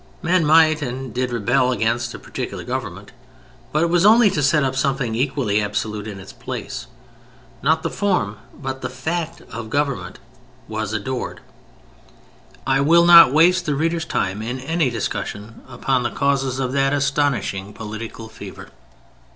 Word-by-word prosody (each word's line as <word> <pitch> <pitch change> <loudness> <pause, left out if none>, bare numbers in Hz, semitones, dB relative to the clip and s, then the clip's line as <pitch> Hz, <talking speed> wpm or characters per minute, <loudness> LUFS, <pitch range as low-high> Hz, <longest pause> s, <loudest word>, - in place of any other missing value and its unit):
Men 170 -2 +2
might 155 0 +5
and 130 -2 -5
did 125 0 -1
rebel 120 +3 +2
against 115 0 -1
a - - -6
particular - - -6
government, - - -5 0.6
but 155 +2 +2
it 170 - +1
was 175 0 +3
only 215 0 +6
to 145 - -1
set 145 +1 +3
up 130 -1 -1
something 135 -3 0
equally 120 -4 0
absolute 105 0 -3
in 100 -2 -7
its 95 - -11
place. - - -6 0.7
Not 160 +1 +2
the - - -1
form 180 - 0
but 135 -2 -6
the 125 - -3
fact 160 +6 -4
of 115 0 -6
government 140 0 -2 0.5
was 110 -1 -3
adored. 120 +4 -4 1.2
I 135 0 +2
will 170 +4 +5
not 170 -5 +9
waste 175 +4 +4
the 145 - +1
reader's 165 +2 0
time 100 -8 -2
in 120 +4 -4
any 160 +1 0
discussion 110 -1 -5
upon 130 -2 -1
the 120 - -1
causes 135 -2 0
of 130 -2 -1
that 135 0 +2
astonishing 135 -9 0
political 110 +1 -7
fever. 110 - -10
135 Hz, 155 wpm, -21 LUFS, 115-155 Hz, 1.2 s, not